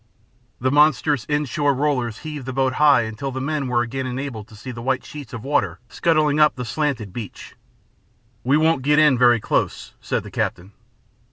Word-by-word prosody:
The 130 +1 0
monstrous 150 -3 +3
in 150 0 0
shore 145 +1 0
rollers 130 -5 -1
heaved 150 -4 -6
the 130 - -3
boat 130 0 +1
high 145 -4 +6
until 110 +5 -5
the 130 - -4
men 140 0 -2
were 120 -1 +1
again 130 +2 -4
enabled 125 -4 -5
to 110 - -15
see 125 +5 -8
the 115 -1 -8
white 130 +2 -1
sheets 150 -2 -9
of 115 -2 -7
water 145 +2 0
scudding 155 -3 +1
up 150 -1 +5
the 125 - -5
slanted 120 -6 -2
beach. 110 -3 -8 0.9
"We 135 +4 +3
won't 160 -3 +2
get 150 +3 +2
in 150 -3 +5
very 120 -1 +5
close," - - -2
said - - -2
the - - -10
captain. 95 +3 -3
135 Hz, 190 wpm, -22 LUFS, 120-150 Hz, 0.9 s, high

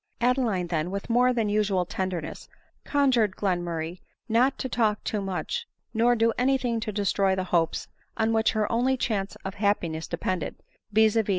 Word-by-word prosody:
Adeline, 235 -7 +1
then, 165 -1 -1
with 200 +4 -4
more 250 +2 +4
than 230 -3 0
usual 205 -3 +1
tenderness, 180 -3 -4 0.3
con 285 -2 +2
jured 220 -6 +2
Glenmurray 175 -3 -2 0.3
not 245 +4 +3
to - - -3
talk 220 -4 +1
too 210 - -2
much, 195 - -3 0.3
nor 240 +2 +4
do 230 0 +2
any 265 +2 +3
thing 240 -3 -1
to 220 -1 -3
destroy 195 -1 +1
the 185 - -1
hopes 165 -2 +1 0.3
on 220 0 +2
which 225 0 +2
her 215 -1 0
only 255 +3 +2
chance 205 -5 -1
of 195 - -3
hap 205 0 +1
piness 160 -1 -4
depended, 175 -1 -2 0.4
viz. 220 +1 +4
210 Hz, 175 wpm, -26 LUFS, 185-235 Hz, 0.4 s, more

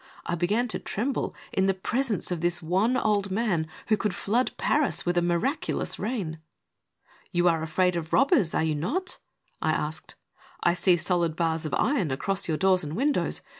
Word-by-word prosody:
I - - -2
began 200 +8 +1
to - - -3
tremble 255 +7 -2 0.2
in 190 0 +2
the 195 - +2
presence 225 +2 -1
of 175 -3 -2
this 175 -1 +1
wan 190 +9 +1
old 205 -3 +1
man 190 -6 0 0.2
who 215 - +5
could 210 -3 -1
flood 235 +5 0
Paris 295 -1 +1
with 175 0 +1
a 175 - +3
miraculous 175 - -1
rain. 195 -9 -3 0.9
"You 175 -1 +2
are 165 -2 +3
afraid 180 +3 +1
of 165 -1 -4
robbers, 270 - +3
are - - +2
you 160 -1 +1
not?" 280 - -2 0.4
I - - +2
asked. - - -4 0.3
" - - -17
I 175 - +4
see 180 0 +3
solid 170 -1 0
bars 165 -1 0
of - - -2
iron 245 - +1
across 195 +9 -1
your 160 -2 0
doors 190 0 +3
and 150 +1 -5
windows. 285 +5 0
185 Hz, 185 wpm, -27 LUFS, 170-220 Hz, 0.9 s, who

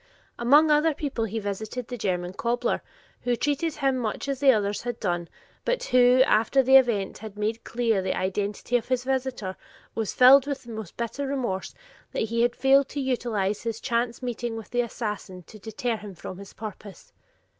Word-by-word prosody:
Among 290 +6 +5
other 300 +1 +3
people, 270 -7 -2
he 225 +1 -4
visited 220 +4 -4
the 250 - -5
German 180 -5 -2
cobbler, 240 +4 -1 0.4
who 245 -1 +1
treated 290 +5 -1
him 270 -3 +1
much 225 +2 -3
as 275 -2 -2
the 275 -1 +6
others 205 -3 0
had 240 -1 -4
done, 175 -4 -2 0.3
but - - 0
who, 250 0 +5
after 260 +3 +3
the 265 +1 +5
event 235 -7 +3
had 215 -1 -9
made 220 +2 -2
clear 230 -4 0
the 185 0 -2
identity 200 +5 -1
of 235 - -6
his 255 -1 0
visitor, 260 -7 -2 0.4
was 220 -3 -3
filled 265 +2 +7
with 280 -2 -3
the 235 - -10
most 220 -5 -7
bitter 240 +4 -3
remorse 240 -9 -3 0.4
that - - 0
he 230 +1 -1
had 240 0 +2
failed 270 +1 +4
to 290 - -4
utilize 230 -7 -1
his 230 -1 -3
chance 235 +1 -1
meeting 240 -1 -3
with 225 - -9
the 245 - +2
assassin 210 -6 -5
to 215 - -14
deter 225 +2 -3
him 205 -3 -10
from 180 +3 -8
his 200 - -11
purpose. 210 -2 -10
235 Hz, 190 wpm, -26 LUFS, 210-260 Hz, 0.4 s, filled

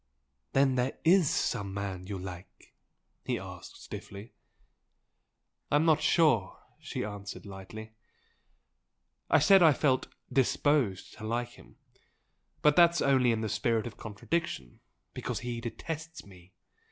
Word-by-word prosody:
"Then 135 -1 +3
there 125 +2 -1
IS 175 -2 +5
some 100 -1 -1
man 95 -2 -4
you 100 -1 -4
like?" 90 0 -10 0.5
he - - -1
asked, - - -10
stiffly. 100 +4 -9 1.4
"I'm 150 +2 +3
not 155 -2 +4
sure!" 150 - +3 0.2
she - - -4
answered, 105 0 -7
lightly 105 +3 -9 1.4
"I - - +6
said 190 +6 +6
I 160 -3 +7
felt 130 -1 +1 0.3
'disposed' 135 -6 +1
to - - -9
like 120 +2 -1
him! - - -17 0.9
But 150 0 +5
that's 170 -1 +5
only 130 -3 +4
in 110 -1 -1
the 110 - -1
spirit 110 +1 0
of 120 - -8
contradiction, 105 - -4 0.3
because - - -4
he 120 -1 -4
detests 160 +7 -6
ME! 90 -2 -17
120 Hz, 130 wpm, -30 LUFS, 100-150 Hz, 1.4 s, I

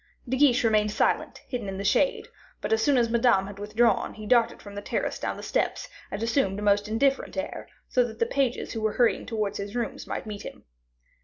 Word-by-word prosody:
De 255 - 0
Guiche 260 -3 +4
remained 215 -2 +3
silent, 210 - 0
hidden 235 -6 -4
in 190 - -5
the 200 - -4
shade; - - +2 0.3
but - - -1
as 220 - +2
soon 280 +3 +3
as 235 -1 +3
Madame 230 -5 +3
had 200 0 -9
withdrawn, 210 +1 +1
he 215 - -8
darted 235 0 +3
from 205 - -11
the 205 - -5
terrace - - -2
down - - -3
the - - -8
steps - - -1 0.2
and 205 +3 -4
assumed 230 -5 +1
a - - -5
most 205 0 +3
indifferent 270 +7 0
air, 285 - -4 0.2
so 250 - +3
that 225 -2 -6
the 230 - +2
pages 260 0 -1
who 225 - -4
were 215 -1 0
hurrying 240 -2 +2
towards 210 -3 -2
his 200 +2 -5
rooms 240 -2 -3
might - - -4
meet 210 -2 -6
him. - - -9
225 Hz, 225 wpm, -27 LUFS, 205-245 Hz, 0.3 s, Guiche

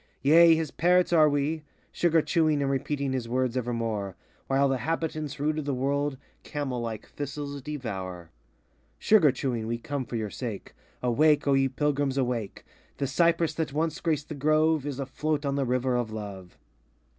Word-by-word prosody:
Yea, 165 +3 +7
his 160 -3 -2
parrots 180 +1 +3
are 155 -2 +6
we, 145 +2 0 0.3
sugar 165 -2 +2
chewing 155 -4 +2
And 135 - 0
repeating 140 0 -1
his 125 -3 -3
words 125 0 0
evermore, 115 -5 -2 0.3
While 135 +1 +3
the 135 -1 0
habitants 155 -2 -3
rude 155 +2 0
of 150 - -5
the 140 -2 -1
world 140 +2 -1 0.2
Camel 135 -5 -3
like 115 -2 -5
thistles 145 0 -5
devour. 95 - -6 0.7
Sugar 180 - +5
chewing 120 -4 -3
we 115 +1 -1
come 135 +2 -4
for 120 - -6
your 110 -3 -3
sake; 115 -6 -6 0.3
Awake, 150 +5 +3
O 140 - +4
ye 135 0 +3
Pilgrims, 140 0 0
awake! 120 -6 -2 0.3
The 140 - -1
cypress 170 +4 +2
that 160 -4 -3
once 160 +1 -1
graced 155 -3 -1
the - - -4
grove, 155 +1 +2
Is 140 -2 -4
a 135 - -2
float 150 +3 -2
on 140 - 0
the 140 -1 0
river 125 0 0
of 120 -2 -1
Love. 100 -4 -8
140 Hz, 175 wpm, -27 LUFS, 125-155 Hz, 0.7 s, Yea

